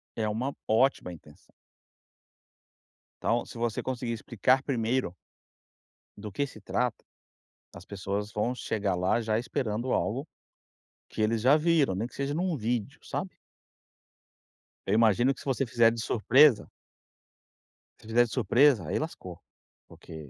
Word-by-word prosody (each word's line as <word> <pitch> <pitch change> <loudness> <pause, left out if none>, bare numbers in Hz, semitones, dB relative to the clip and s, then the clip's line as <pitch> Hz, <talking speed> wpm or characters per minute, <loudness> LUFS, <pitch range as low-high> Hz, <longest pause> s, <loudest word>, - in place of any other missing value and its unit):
é 110 -1 -1
uma 125 +6 -2
ótima 115 -5 +2
intenção. 75 -3 -16 1.7
Então, 120 +1 0
se - - -11
você 115 -2 -1
conseguir 125 -2 -4
explicar 125 +3 +1
primeiro 120 -6 -1 1.0
do 105 -1 -7
que 140 +8 -1
se 110 - -13
trata, 105 +4 -2 0.7
as 90 - -12
pessoas 100 +2 -4
vão 110 +5 -1
chegar 100 -6 -2
lá 90 +6 +1
já 110 -1 0
esperando 120 0 -2
algo 135 +8 -1 0.8
que - - -7
eles 110 +1 +1
já 135 +4 +6
viram, 155 - +2
nem 110 +4 -2
que - - -15
seja 140 +1 -2
num 175 -1 -1
vídeo, 115 -2 -3
sabe? - - -5 1.5
Eu 95 - 0
imagino 115 +4 +4
que - - -16
se - - -12
você 135 -1 0
fizer 115 0 +4
de 115 -1 -4
surpresa 125 +3 +4 1.3
se - - -19
fizer 120 +2 +4
de 115 - -10
surpresa, 120 - +3
aí - - -1
lascou, - - -7 0.5
porque 80 -3 -11
115 Hz, 140 wpm, -28 LUFS, 105-130 Hz, 1.7 s, já